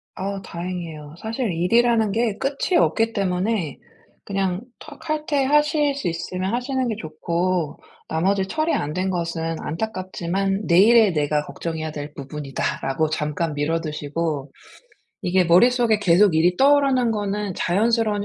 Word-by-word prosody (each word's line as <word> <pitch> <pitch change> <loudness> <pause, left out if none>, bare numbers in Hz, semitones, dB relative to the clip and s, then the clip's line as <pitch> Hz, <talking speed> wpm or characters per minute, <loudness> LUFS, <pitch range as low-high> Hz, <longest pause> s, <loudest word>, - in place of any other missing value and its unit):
아 195 0 -4
다행이에요. 170 -4 -6
사실 225 -1 -2
일이라는 220 +5 +2
게 220 -1 0
끝이 280 +6 -1
없기 225 -6 +2
때문에 185 -4 -1 0.5
그냥 195 -1 -1 0.2
터 300 -2 -11
칼퇴하실 295 -1 +1
수 240 -10 -3
있으면 185 +4 -3
하시는 255 +1 -1
게 220 - -1
좋고 170 +1 -2 0.3
나머지 190 +4 +1
처리 315 +5 0
안 145 +1 -1
된 185 +2 -1
것은 165 -2 -2
안타깝지만 195 +1 -2
'내일의 205 +3 +6
내가 150 0 0
걱정해야 160 +2 -5
될 145 0 -7
부분이다.'라고 140 +1 -2
잠깐 150 +1 -2
미뤄두시고 150 -1 -2 0.7
이게 180 0 +2
머릿속에 225 +5 +4
계속 185 -1 +4
일이 175 +3 +3
떠오르는 270 -3 +4
거는 205 -2 -2
자연스러운 210 +2 +1
185 Hz, 310 characters per minute, -22 LUFS, 165-225 Hz, 0.7 s, 내일의